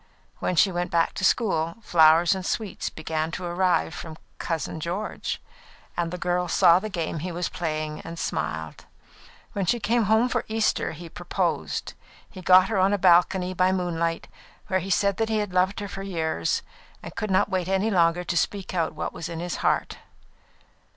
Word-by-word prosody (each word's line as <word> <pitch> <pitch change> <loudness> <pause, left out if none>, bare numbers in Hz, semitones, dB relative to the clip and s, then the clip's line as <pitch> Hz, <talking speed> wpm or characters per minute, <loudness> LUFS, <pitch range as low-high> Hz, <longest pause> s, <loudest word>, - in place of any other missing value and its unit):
When 180 - -1
she 190 +3 +4
went 175 0 -2
back 165 -1 +1
to - - -5
school, 170 -6 +1
flowers 165 -1 +5
and 190 -1 -4
sweets 210 +1 -3
began 155 0 -3
to 185 - -4
arrive 175 -1 +1
from 160 -2 -8 0.2
"Cousin 160 -1 -3
George"; 180 +7 -3 0.6
and 170 -1 -1
the 180 - -5
girl 180 0 0
saw 170 +1 +5
the 215 +3 -5
game 165 -5 -3
he 180 +4 -4
was 175 +1 -2
playing 155 -2 -3
and 165 +1 -8
smiled. - - -4 0.7
When 200 -4 -2
she 240 - +2
came 230 +1 +1
home 220 +4 +4
for 255 - -1
Easter, 220 -5 0
he 170 +2 -9
proposed. 170 - -2 0.3
He 185 - -11
got 185 +1 +6
her 210 -4 +1
on 190 +2 +3
a - - +2
balcony, 180 0 +4
by 185 +1 +3
moonlight, 170 -3 -1 0.4
where 190 -1 +2
he 190 +2 -6
said 200 +1 +2
that 225 0 0
he 220 - +1
had 205 -3 -2
loved 185 +2 +2
her 205 - -4
for 195 0 -7
years, 160 - -1 0.4
and - - -9
could 215 - -3
not 190 +2 +2
wait 185 -3 -1
any 195 +3 +1
longer 170 -1 +3
to 175 - -3
speak 190 +3 -1
out 165 -3 -1
what - - -4
was 165 - -6
in 165 -1 -5
his 175 +1 -3
heart. - - 0
180 Hz, 190 wpm, -25 LUFS, 165-195 Hz, 0.7 s, got